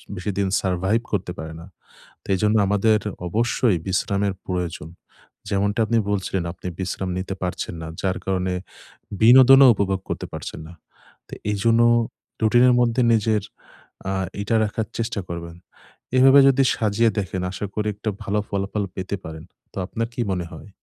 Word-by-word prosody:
বেশিদিন 100 +1 -2
survive 95 +5 0
করতে 95 -3 -2
পারে 80 0 -6
না। 85 - -10 0.6
তো - - -20
এজন্য 105 +3 +2
আমাদের 105 +1 +3 0.3
অবশ্যই 115 0 +1
বিশ্রামের 100 +1 0
প্রয়োজন। 90 -4 -3 0.6
যেমনটা 100 +3 0
আপনি 115 +1 +2
বলছিলেন 95 -2 -1
আপনি 90 - -11
বিশ্রাম 95 0 -3
নিতে 95 +1 -4
পারছেন 90 -1 -3
না। 80 - -5 0.2
যার 95 -1 0
কারণে 95 -1 -1 0.7
বিনোদনও 130 +4 +8
উপভোগ 95 -2 -1
করতে - - -4
পারছেন - - -7
না। - - -11 0.6
তো - - -21 0.2
এইজন্য 115 +3 +2 0.6
রুটিনের 120 +3 +5
মধ্যে 120 +1 +2
নিজের 110 -2 +2 0.7
আ - - -1 0.3
এটা 115 +2 0
রাখার 105 +1 -3
চেষ্টা 115 -2 -2
করবেন। 85 0 -7 0.6
এভাবে 135 +2 +7
যদি 135 0 +3
সাজিয়ে 110 +1 +2
দেখেন 95 -1 -3
আশা 100 +2 -4
করি 105 0 -1
একটা 105 +2 -5
ভালো 105 +2 -1
ফলাফল 100 +1 -2
পেতে 95 +2 -4
পারেন। 80 0 -8 0.3
তো - - -23
আপনার 115 +3 -3
কি - - -4
মনে 90 -2 -3
হয়? 80 +5 -11
100 Hz, 150 wpm, -22 LUFS, 95-115 Hz, 0.7 s, বিনোদনও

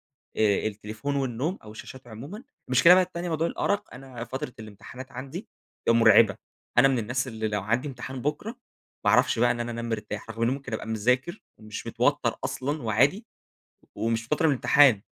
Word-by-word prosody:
آآ، 110 -4 0
التليفون 110 +6 -4
والنوم 135 +7 -2
أو 105 - -11
الشاشات 125 +3 -11
عمومًا. 140 - -9 0.3
المشكلة 170 +8 +7
بقى 185 - +5
التانية 175 0 -5
موضوع 165 0 0
الأرق، 205 -1 -2
أنا 125 -2 -8
فترة 130 0 -5
الامتحانات 110 +5 -10
عندي 140 - -7 0.4
آآ - - +7
مرعبة. 110 -3 +6 0.4
أنا 135 +2 +7
من 130 -3 +1
الناس 120 +4 -2
اللي 110 -2 -3
لو 105 -2 -2
عندي 120 +7 0
امتحان 130 0 -7
بكرة 150 +9 -2 0.5
ما 100 - +4
أعرفش 125 +1 +3
بقى 120 +1 +4
إن 120 - -1
أنا 120 0 -3
أنام 115 0 -4
مرتاح، 105 0 -4
رغم 115 +1 -5
إني 120 +3 +3
ممكن 135 -2 -6
أبقى - - -5
مذاكر 125 - 0 0.2
ومش 110 -1 -8
متوتر - - +1
أصلًا 145 +3 -3
وعادي. 140 - +2 0.7
ومش 115 0 -1
متوتر 150 +6 0
من 150 - +4
الامتحان، 135 -4 +5
125 Hz, 180 wpm, -26 LUFS, 110-140 Hz, 0.7 s, المشكلة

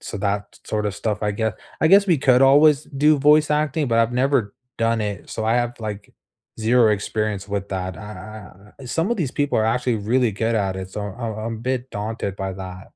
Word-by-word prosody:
so - - -6
that 100 0 -3
sort 105 -1 -2
of 100 - -3
stuff, 105 0 -2
I 105 -1 0
guess 110 +1 -1 0.3
I 160 - +4
guess 200 +3 +6
we 175 - +4
could 130 -1 +4
always 145 +2 +5
do 150 +2 +2
voice 150 +2 +4
acting, 150 -1 0
but 115 -1 +2
I've 115 +1 +2
never 125 -5 +1 0.2
done 115 0 +1
it, 105 -3 -4
so 110 - -3
I 110 +1 +2
have, 120 0 0
like, 105 -2 -6 0.5
0 115 0 +4
experience 105 -1 -2
with 100 -1 -3
that, 95 -1 -4
uh - - -10
uh 105 -1 -11
uh, - - -9
some 165 - -1
of 240 - +1
these 160 -10 -1
people 145 -4 0
are 110 - +2
actually 120 +1 +1
really 115 +3 +1
good 115 +3 -1
at 100 -3 0
it, 95 0 -6
so 105 - -5
I'm 110 +3 -5
I'm 115 +1 -4
a - - -10
bit 130 +2 -3
daunted 105 -2 -4
by 95 -1 -3
that. 95 0 -8
110 Hz, 225 wpm, -22 LUFS, 105-130 Hz, 0.5 s, guess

